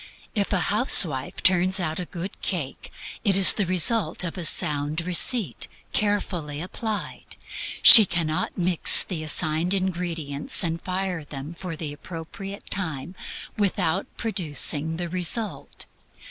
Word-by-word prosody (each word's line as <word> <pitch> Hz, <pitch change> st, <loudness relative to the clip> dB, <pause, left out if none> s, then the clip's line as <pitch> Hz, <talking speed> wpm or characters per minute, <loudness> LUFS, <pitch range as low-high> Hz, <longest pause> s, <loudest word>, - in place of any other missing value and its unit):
If 205 Hz, -2 st, -2 dB
a 200 Hz, -, +1 dB
housewife 170 Hz, -, +5 dB
turns 185 Hz, +1 st, +4 dB
out 160 Hz, -2 st, -3 dB
a 180 Hz, -, -4 dB
good 180 Hz, +2 st, -7 dB
cake, 155 Hz, -8 st, -5 dB, 0.3 s
it 195 Hz, -2 st, +3 dB
is 195 Hz, -, +7 dB
the 205 Hz, -4 st, -1 dB
result 185 Hz, +4 st, +1 dB
of 170 Hz, -, -5 dB
a 180 Hz, -, -5 dB
sound 150 Hz, 0 st, 0 dB
receipt, 180 Hz, -, -1 dB, 0.3 s
carefully 180 Hz, -8 st, -2 dB
applied. 210 Hz, +5 st, -6 dB, 0.5 s
She 220 Hz, -4 st, +11 dB
cannot 170 Hz, 0 st, -3 dB
mix 180 Hz, -2 st, +4 dB
the 175 Hz, -5 st, -6 dB
assigned 155 Hz, +3 st, 0 dB
ingredients 170 Hz, -6 st, -1 dB
and 165 Hz, 0 st, -3 dB
fire 185 Hz, -3 st, -4 dB
them 145 Hz, +2 st, -9 dB
for 180 Hz, -1 st, -8 dB
the 155 Hz, -2 st, -6 dB
appropriate 185 Hz, +6 st, -10 dB
time 160 Hz, -4 st, -3 dB, 0.4 s
without 190 Hz, -3 st, -1 dB
producing 160 Hz, -, -1 dB
the 175 Hz, 0 st, -4 dB
result. 180 Hz, -1 st, -4 dB
175 Hz, 130 wpm, -23 LUFS, 155-195 Hz, 0.5 s, She